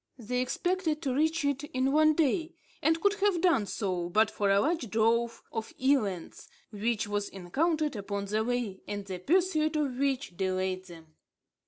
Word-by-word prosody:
They 250 +1 -2
expected 340 +4 -1
to 265 -3 0
reach 315 +2 +1
it 285 0 0
in 265 -2 0
one 310 +1 +4
day, 320 +2 +1 0.3
and 320 +3 +2
could 405 +3 +3
have 400 -4 +3
done 330 - +3
so, 180 -4 -2
but 215 +4 +3
for 205 -2 0
a 195 0 +5
large 290 -1 0
drove 230 +2 +1
of 225 -1 -5
elands, 220 -10 0 0.2
which 220 +1 -1
was 205 0 -2
encountered 300 - -1
upon 200 -1 -3
the 215 +2 0
way, 235 -5 -2
and 205 -1 -4
the 185 -2 -5
pursuit 310 - +2
of 275 -4 -1
which 275 -8 -1
delayed 185 -1 -1
them. 165 -3 -14
245 Hz, 170 wpm, -29 LUFS, 200-310 Hz, 0.3 s, a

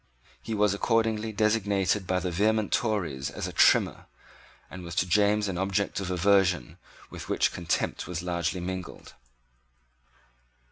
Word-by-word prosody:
He 110 - -4
was 105 -1 +2
accordingly 110 +1 0
designated 105 -2 +1
by 95 0 +1
the 90 0 -3
vehement 105 +4 +1
Tories 85 - -1
as - - -5
a - - -7
Trimmer, - - +3 0.6
and 90 - -9
was 85 0 -7
to 85 - +2
James 105 +3 +2
an 90 -2 -3
object 100 +1 -1
of 95 -2 -4
aversion 90 -5 +2 0.3
with - - -9
which - - +1
contempt 85 -1 -2
was 90 -1 -4
largely 90 0 -2
mingled. 95 0 -7
95 Hz, 140 wpm, -27 LUFS, 90-105 Hz, 0.6 s, Trimmer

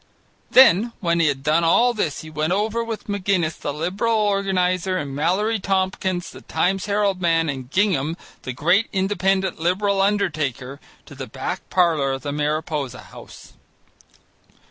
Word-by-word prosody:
Then 235 -2 +6
when 170 -2 0
he 165 - +3
had 135 -2 -1
done 155 +3 +2
all 235 +9 +4
this 175 -10 -2
he 155 - -10
went 155 +3 -1
over 215 +4 0
with 230 -2 -6
McGinnis 190 -5 -1
the 145 - -3
Liberal 190 +10 -1
organizer 190 -3 0
and 145 -5 -4
Mallory 195 +9 0
Tompkins, 190 -1 -1
the - - -12
Times 195 +2 -1
Herald 200 -2 0
man, 165 -2 +2
and 130 -3 -5
Gingham 165 -4 +1 0.2
(the 130 - -5
great 175 - +2
Independent 190 -2 0
Liberal 195 +4 +1
undertaker) 150 - -1 0.3
to - - -13
the - - -7
back - - -5
parlour 160 -7 +2
in 135 - -5
the 145 - -4
Mariposa 150 -3 -2
House. - - -13
180 Hz, 150 wpm, -22 LUFS, 155-200 Hz, 0.3 s, Then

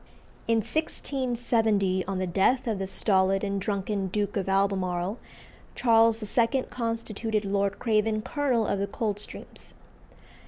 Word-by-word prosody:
In 225 -1 +3
1670, 230 -9 0
on 195 0 -3
the 185 - 0
death 200 +9 +2
of 220 -4 -1
the 195 - -2
stolid 195 0 +2
and 200 -1 -1
drunken 200 -1 -1
Duke 205 +2 -2
of 195 -2 -1
Albemarle, 195 0 0 0.6
Charles 225 -1 +4
II. 245 +2 +3
constituted 230 -2 -2
Lord 200 0 0
Craven 215 -2 +1
colonel 260 -6 0
of 200 - -1
the 200 - -1
Coldstreams. 205 0 -4
210 Hz, 125 wpm, -27 LUFS, 195-230 Hz, 0.6 s, Charles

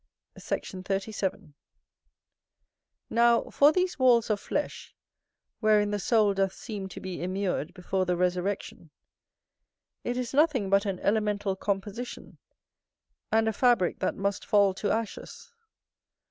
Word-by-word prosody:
Sect. - - -4
37. 195 -2 -3 1.6
Now, 235 0 +3
for 290 +1 +6
these 365 -1 -1
walls 240 -3 +4
of 205 - 0
flesh, 290 +7 -4 0.6
wherein 210 -2 +3
the 205 - -1
soul 210 0 +3
doth 195 -1 0
seem 195 -2 -6
to - - -8
be 185 -1 -6
immured 185 -3 -2
before 185 +1 -2
the 180 -1 +1
resurrection, 180 -1 -2 1.1
it 245 +1 -2
is 250 0 -3
nothing 270 -9 +2
but 200 +1 +3
an 195 -2 -2
elemental 205 -2 0
composition, 205 +5 -5 0.9
and 225 0 +3
a 220 - +1
fabrick 240 -6 +2
that - - -1
must 200 +1 -2
fall 200 -3 +3
to 205 +2 -2
ashes. 465 - -4
205 Hz, 125 wpm, -28 LUFS, 190-235 Hz, 1.6 s, for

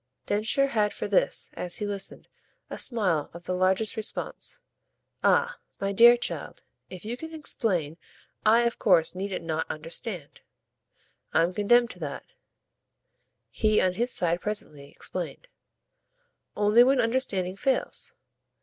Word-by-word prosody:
Densher 220 +7 +1
had 215 -6 0
for - - -3
this, 200 - +1
as 175 -1 -3
he 210 - -3
listened, 200 -1 -5 0.4
a - - -5
smile 195 - +2
of 170 - -9
the 185 - -3
largest 190 +4 +1
response. 220 -1 -1 0.6
"Ah 485 +1 +2 0.2
my 195 0 -1
dear 235 +4 +7
child, 240 - -5 0.3
if 185 +2 -10
you 230 +3 -3
can 320 +5 -8
explain 185 - -1 0.5
I 225 +2 +5
of 235 0 -1
course 175 -6 +4
needn't 185 -2 -4
not 160 0 -2
'understand.' 165 - -5 0.9
I'm 170 +2 +3
condemned 235 +4 +3
to - - -11
that," - - -6 1.3
he 215 -1 +2
on 185 -1 +2
his 240 +6 -1
side 175 0 +1
presently 150 -9 -4
explained, - - -6 1.1
"only 210 +3 +6
when 265 +1 +3
understanding 225 -6 0
fails." 270 - -1
205 Hz, 130 wpm, -27 LUFS, 180-235 Hz, 1.3 s, dear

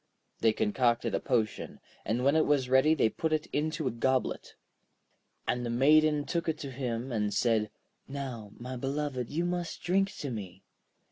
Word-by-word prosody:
They 115 - +4
concocted 120 +3 +1
a - - +1
potion, 110 -3 -1 0.3
and 115 +4 0
when 140 +2 +4
it 160 - +3
was 140 -4 +2
ready 130 +5 +5
they 130 - +3
put 160 +8 -2
it 155 -1 +1
into 155 0 -1
a - - +1
goblet. 130 +3 -1 0.9
And 125 0 0
the 120 - -2
Maiden 150 +4 +4
took 170 -1 -1
it 160 - -1
to 140 -3 -5
him, 125 -1 -3
and 105 -3 0
said: 110 -3 +2 0.4
'Now, 130 -7 -6
my 125 +2 -6
beloved, 135 -1 -2
you 165 +4 -1
must 175 -1 -3
drink 195 +2 +2
to 140 - -4
me.' 95 -4 -7
130 Hz, 175 wpm, -30 LUFS, 115-155 Hz, 0.9 s, ready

